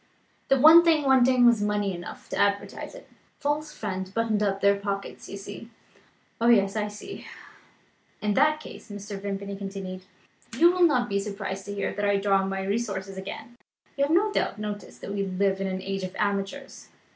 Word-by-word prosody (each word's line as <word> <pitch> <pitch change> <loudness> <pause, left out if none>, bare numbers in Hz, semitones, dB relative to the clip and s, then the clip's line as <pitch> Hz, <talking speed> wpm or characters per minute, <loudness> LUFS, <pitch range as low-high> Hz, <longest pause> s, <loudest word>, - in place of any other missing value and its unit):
The 270 - +3
one 320 +5 +9
thing 320 -3 +3
wanting 260 -2 +5
was 235 -3 +5
money 205 -1 0
enough 175 0 -9
to - - -4
advertise 200 - -1
it. - - -13 0.3
False 300 +1 -2
friends 190 -8 -4
buttoned 220 0 0
up 195 -1 0
their 200 0 +4
pockets. 200 0 -5
You 200 - -6
see?" 205 +3 -9 0.7
"Oh, 230 - +3
yes; 200 -4 +4
I 210 -1 0
see." 210 - -9 0.9
"In 210 -1 0
that 305 +5 +3
case," 305 - -11
Mr. 205 -1 -7
Vimpany 200 0 -4
continued, 195 -1 -6 0.6
"you 340 +5 +7
will 360 -1 +5
not 250 -6 +1
be 200 -2 0
surprised 195 -1 -5
to 205 0 -6
hear 200 - -2
that 205 - -4
I 205 0 +3
draw 195 0 +3
on 195 0 -1
my 195 0 -3
resources 195 -2 -2
again. 220 +5 -8 0.4
You 280 0 +2
have 290 - -3
no 405 +6 +3
doubt 215 - -1
noticed 210 -1 -6
that 200 - -5
we 200 -1 -1
live 195 0 0
in 195 - -1
an 185 0 -4
age 195 0 -3
of 185 0 -6
amateurs. 205 +7 -3
205 Hz, 190 wpm, -26 LUFS, 195-245 Hz, 0.9 s, one